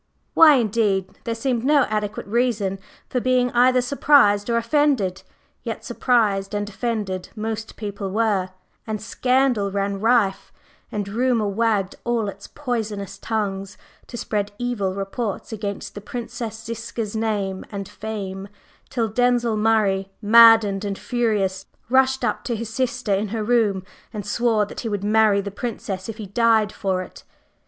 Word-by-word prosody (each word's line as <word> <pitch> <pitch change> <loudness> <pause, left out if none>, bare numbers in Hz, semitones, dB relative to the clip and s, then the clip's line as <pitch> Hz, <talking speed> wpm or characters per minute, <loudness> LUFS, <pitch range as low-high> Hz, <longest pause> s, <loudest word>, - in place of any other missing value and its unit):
Why, 310 -3 +8
indeed? 210 -5 0
There 230 - -1
seemed 240 0 -1
no 285 0 +4
adequate 210 -2 -3
reason 210 -4 0 0.3
for 250 - -1
being 250 0 +2
either 250 +1 +4
surprised 245 -5 +4
or 235 - +2
offended; 235 -6 +1 0.4
yet - - -5
surprised 210 -5 +1
and 205 0 -2
offended 205 -3 -3
most 220 0 -4
people 200 -2 -5
were, 200 -3 +1 0.4
and 215 -1 -2
scandal 250 -2 +1
ran 200 0 -1
rife, 220 -3 +2 0.4
and 205 -2 -3
rumor 230 +1 +1
wagged 200 -2 0
all 235 -3 0
its - - -10
poisonous 215 -8 -4
tongues 200 -3 -3 0.3
to 240 - -7
spread 205 -3 -2
evil 220 -6 -2
reports 200 +2 -4
against 205 -2 -5
the 205 - -8
Princess 225 0 -6
Ziska's 230 -1 -5
name 205 -4 -1
and 200 -2 -5
fame, 200 -3 -6 0.4
till 230 -3 0
Denzil 240 0 +2
Murray, 210 -3 +2
maddened 220 -2 +6
and 200 -1 -3
furious, 205 -4 -1 0.2
rushed 265 0 +3
up - - -1
to 240 - -1
his 225 0 -5
sister 250 -4 -1
in 200 +2 0
her 220 +1 -3
room 210 -5 +2 0.3
and 210 -3 -6
swore 220 0 +1
that - - -9
he 230 - -3
would 205 -2 -3
marry 210 -1 +4
the 200 0 -6
Princess 205 -3 -5
if 220 - -6
he 215 - -6
died 220 +1 +2
for 190 -3 -1
it. - - -13
215 Hz, 150 wpm, -22 LUFS, 200-235 Hz, 0.4 s, Why